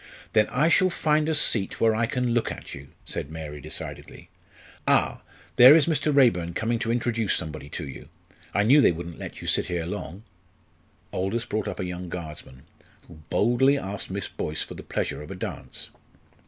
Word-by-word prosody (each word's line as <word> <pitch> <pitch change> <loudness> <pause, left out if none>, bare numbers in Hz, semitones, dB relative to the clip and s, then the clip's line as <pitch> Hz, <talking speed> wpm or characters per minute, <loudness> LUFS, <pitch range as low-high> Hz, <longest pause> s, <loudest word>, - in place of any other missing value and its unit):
"Then 105 -1 +4
I 150 +5 +2
shall 185 +2 +4
find 155 -2 +1
a 160 - +1
seat 110 -9 +2
where 115 -1 +4
I 115 +1 +1
can 125 -1 -1
look 120 -1 0
at - - -8
you," 70 0 -9 0.2
said - - -4
Mary, 75 -2 -7
decidedly. 75 +3 -6 0.6
"Ah, - - +2 0.4
there 130 +5 +10
is 160 -3 +5
Mr. 155 -2 +1
Raeburn 90 - +3
coming 115 +1 0
to 115 -1 -1
introduce 115 -3 +1
somebody 75 -3 -4
to 70 - -5
you. 65 - -10 0.4
I 105 - +2
knew 135 +7 +6
they - - +5
wouldn't 85 0 -7
let - - -8
you - - -7
sit - - +2
here 85 -2 -2
long." 100 +1 -6 0.9
Aldous 100 +6 -1
brought 105 -1 -2
up - - -5
a 90 - -2
young 90 0 -6
Guardsman, 75 -6 -8 0.4
who - - -14
boldly 125 +6 +3
asked 100 -5 -5
Miss 100 +1 -3
Boyce 75 0 -3
for - - -9
the - - -9
pleasure - - -3
of 75 - -10
a - - -6
dance. 65 -7 -6
105 Hz, 190 wpm, -25 LUFS, 85-125 Hz, 0.9 s, there